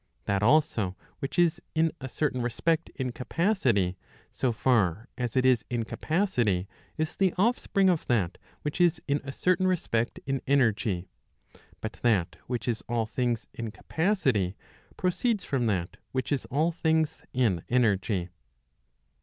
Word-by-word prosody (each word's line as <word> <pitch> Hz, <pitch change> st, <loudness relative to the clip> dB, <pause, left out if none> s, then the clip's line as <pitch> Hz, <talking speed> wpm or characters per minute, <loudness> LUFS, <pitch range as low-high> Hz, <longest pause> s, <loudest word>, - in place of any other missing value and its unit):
That 100 Hz, 0 st, +1 dB
also 110 Hz, -7 st, +3 dB, 0.2 s
which 135 Hz, -, -4 dB
is 175 Hz, -2 st, +3 dB
in 160 Hz, 0 st, +3 dB
a 130 Hz, -, -5 dB
certain 135 Hz, -2 st, -1 dB
respect 160 Hz, +7 st, 0 dB
in 130 Hz, -3 st, -2 dB
capacity, 120 Hz, -, +1 dB, 0.3 s
so 130 Hz, -, 0 dB
far 110 Hz, -3 st, +2 dB
as 125 Hz, -1 st, -2 dB
it 130 Hz, -, +3 dB
is 125 Hz, -3 st, +4 dB
in 120 Hz, -2 st, -1 dB
capacity, 120 Hz, -, 0 dB, 0.3 s
is 155 Hz, 0 st, -2 dB
the 190 Hz, -3 st, +2 dB
offspring 200 Hz, -2 st, +2 dB
of 175 Hz, -4 st, +1 dB
that 100 Hz, -7 st, +1 dB, 0.2 s
which 150 Hz, +4 st, -2 dB
is 175 Hz, -2 st, +4 dB
in 140 Hz, 0 st, +1 dB
a 140 Hz, -, -5 dB
certain 185 Hz, +5 st, +2 dB
respect 120 Hz, -11 st, 0 dB
in 135 Hz, -1 st, -1 dB
energy. 110 Hz, -9 st, +2 dB, 0.8 s
But 110 Hz, -, -4 dB
that 105 Hz, -8 st, +2 dB
which 125 Hz, 0 st, -3 dB
is 115 Hz, -2 st, 0 dB
all 115 Hz, -1 st, +1 dB
things 120 Hz, 0 st, -1 dB
in 115 Hz, -1 st, -4 dB
capacity, 130 Hz, -, 0 dB, 0.4 s
proceeds 190 Hz, +3 st, +1 dB
from 125 Hz, -4 st, 0 dB
that 90 Hz, -5 st, -1 dB, 0.2 s
which 130 Hz, +2 st, -2 dB
is 145 Hz, -, 0 dB
all 155 Hz, +6 st, +1 dB
things 160 Hz, -2 st, 0 dB
in 110 Hz, -10 st, +1 dB
energy. 100 Hz, -6 st, +2 dB
125 Hz, 145 wpm, -28 LUFS, 110-160 Hz, 0.8 s, is